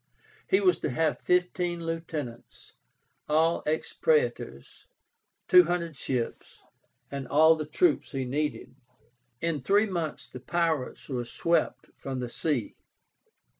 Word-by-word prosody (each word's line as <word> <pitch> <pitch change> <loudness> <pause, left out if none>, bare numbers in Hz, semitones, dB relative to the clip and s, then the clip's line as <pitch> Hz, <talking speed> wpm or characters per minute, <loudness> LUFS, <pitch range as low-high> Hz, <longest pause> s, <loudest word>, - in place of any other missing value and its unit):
He 190 - +4
was 180 -3 +3
to - - -2
have 155 +4 0
fifteen 180 -1 0
lieutenants, 155 -7 -6 0.6
all 160 +2 +3
ex 155 +1 -1
praetors, 480 0 -1 0.6
two 360 0 +8
hundred 170 -3 -2
ships, 125 -4 -4 0.5
and 140 -1 -5
all 160 +2 +6
the 155 -2 -4
troops 360 - +1
he 135 -3 -2
needed. 150 +4 -3 0.7
In 165 -4 -1
three 200 +10 +3
months 170 -7 -4
the 130 - -9
pirates 160 -1 -1
were 125 -3 -2
swept 170 +8 -1
from 135 -1 -5
the 125 -1 -4
sea. 140 -5 -2
160 Hz, 125 wpm, -28 LUFS, 140-175 Hz, 0.7 s, two